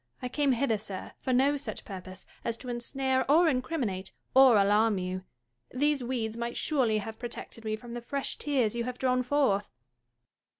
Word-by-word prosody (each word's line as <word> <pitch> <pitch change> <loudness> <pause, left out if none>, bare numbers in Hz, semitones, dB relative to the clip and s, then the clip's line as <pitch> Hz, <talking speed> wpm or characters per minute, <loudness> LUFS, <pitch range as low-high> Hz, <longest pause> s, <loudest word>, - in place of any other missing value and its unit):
I 250 - -4
came 280 0 +2
hither, 230 -3 +1
sir, 195 -3 -6
for 260 - -2
no 275 +3 +3
such 285 - -6
purpose 185 -1 -8 0.2
as 230 -1 -2
to 250 +1 -8
ensnare 260 +2 0
or 335 +3 +6
incriminate 255 - -1 0.2
or 260 -4 +8
alarm 205 +1 +4
you. 185 0 -4 0.4
These 285 +1 +1
weeds 235 -3 -2
might 235 0 -3
surely 250 -8 +2
have 220 +1 -5
protected 235 -1 -7
me 215 0 0
from 235 +2 -10
the 240 - -4
fresh 275 +3 -3
tears 260 -7 +1
you 235 - -1
have 250 0 -4
drawn 255 -1 +2
forth. 250 -7 +1
240 Hz, 175 wpm, -29 LUFS, 215-265 Hz, 0.4 s, or